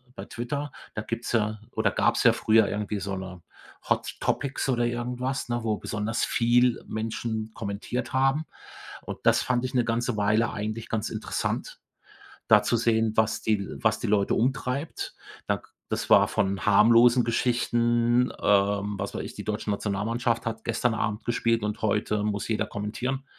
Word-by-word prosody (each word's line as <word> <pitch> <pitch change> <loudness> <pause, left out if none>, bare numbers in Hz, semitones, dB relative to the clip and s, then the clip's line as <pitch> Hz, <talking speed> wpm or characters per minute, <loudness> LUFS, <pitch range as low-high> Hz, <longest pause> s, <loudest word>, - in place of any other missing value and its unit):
bei - - -7
Twitter, 140 +4 -4 0.2
da 105 - -2
gibt's 115 +2 -4
ja 110 -2 0
oder 110 -3 +1
gab's - - +2
ja - - +7
früher 110 -1 +4
irgendwie 105 0 -2
so 100 +1 -4
'ne 95 -2 -7 0.5
Hot - - 0
Topics 140 -1 -1
oder 120 -2 +2
irgendwas, 125 +2 -2
ne, 120 -1 -1
wo 110 -2 0
besonders 105 +2 -2
viel 120 +1 +2
Menschen 110 0 -3
kommentiert 105 +4 -4
haben. 135 +4 +2 0.6
Und - - -7
das - - +4
fand 125 -1 0
ich 130 - -4
'ne 120 -2 +2
ganze 115 -1 -1
Weile 105 +3 +2
eigentlich 110 +2 -4
ganz 110 -1 -1
interessant, 110 -1 -3 0.7
da - - +7
zu 120 - +1
sehen, 110 -1 +2
was 110 0 +1
die 110 -1 +2
L 100 - -6
was - - +2
die - - -2
Leute 100 -1 +2
umtreibt. 130 +4 -2 0.3
Da - - +1
k - - -21 0.2
das - - -2
war - - +7
von 95 0 -1
harmlosen 115 +4 +6
Geschichten, 120 +1 +2
ähm, 100 0 +2
was 100 - -4
weiß - - -3
ich, - - -8
die - - -7
deutsche 105 0 -3
Nationalmannschaft 115 +4 -1
hat 110 0 -4
gestern 125 -2 0
Abend 105 0 -2
gespielt 115 -1 +1
und 105 0 -3
heute 105 0 0
muss 105 0 -2
jeder 110 -1 0
kommentieren 125 +7 -4
115 Hz, 170 wpm, -26 LUFS, 105-120 Hz, 0.7 s, ja